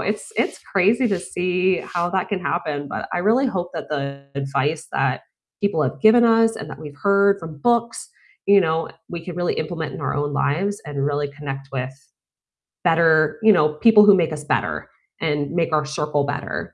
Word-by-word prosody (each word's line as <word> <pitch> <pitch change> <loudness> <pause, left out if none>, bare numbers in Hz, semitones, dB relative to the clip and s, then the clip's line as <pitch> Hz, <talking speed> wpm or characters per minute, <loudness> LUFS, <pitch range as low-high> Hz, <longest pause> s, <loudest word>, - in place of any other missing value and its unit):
it's 445 - -3
it's - - 0
crazy 210 +6 +2
to 195 -5 -1
see 180 +1 0
how 175 0 -3
that 190 -1 -1
can 200 -2 -2
happen, 150 -5 -3
but - - -5
I - - 0
really 225 +9 +2
hope 180 -7 -3
that - - -6
the 140 -2 -4
advice 140 +3 -2
that - - 0 0.4
people 200 -6 0
have - - -4
given 230 +2 +6
us 225 -1 +4
and 145 - -7
that - - -9
we've 145 -1 -10
heard 200 0 +3
from 160 -4 -9
books, 235 +2 0 0.4
you 200 0 +6
know, 160 -2 0 0.2
we 170 -1 -7
can 175 -1 -7
really 175 0 0
implement 160 -1 -4
in - - -7
our - - -2
own 145 0 -1
lives 175 +9 -1
and 140 -2 -3
really 145 0 -1
connect 135 -1 -7
with 130 -1 -3 0.9
better 165 0 +3
you 220 -1 +7
know, 150 -4 +2
people 215 +5 +6
who 205 -1 +7
make 165 -4 +1
us 150 -1 -6
better, 150 - -2 0.3
and 150 -3 -1
make 170 -1 0
our 155 -1 +1
circle 150 -1 -1
better, 145 0 -5
165 Hz, 195 wpm, -21 LUFS, 145-200 Hz, 0.9 s, you